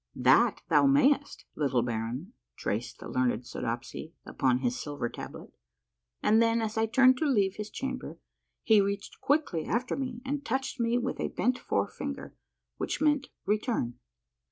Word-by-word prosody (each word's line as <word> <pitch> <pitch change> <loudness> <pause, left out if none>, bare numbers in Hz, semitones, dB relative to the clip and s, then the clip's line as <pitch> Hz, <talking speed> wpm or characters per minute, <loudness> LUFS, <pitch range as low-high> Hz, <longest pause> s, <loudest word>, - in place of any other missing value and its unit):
" - - -43 0.2
That - - +4
thou - - +5
mayest, 285 +1 +3
little 130 -5 +1
baron," 120 - -3 0.2
traced 110 +4 -3
the - - -9
learned 125 -1 0
Soodopsy 120 +8 -5
upon 130 -2 +1
his 125 -1 -1
silver 145 -5 -3
tablet; - - -9 0.7
and 220 +2 +5
then 230 0 +3
as 220 -1 -2
I 225 0 +2
turned 255 +2 +5
to 315 - +1
leave 200 -8 +2
his 210 0 -5
cham 265 +3 -3
ber - - -9 0.5
he 220 -3 +6
reached 200 +1 -3
quickly 280 - +1
after 245 +3 -1
me 255 -3 -4
and 285 +2 -2
touched 265 +1 -2
me 235 +1 +2
with 255 +1 -2
a - - 0
bent 250 +1 0
forefinger, - - -3 0.4
which - - -2
meant 295 -2 +2 0.2
return. 210 - -1
220 Hz, 160 wpm, -29 LUFS, -, 0.7 s, he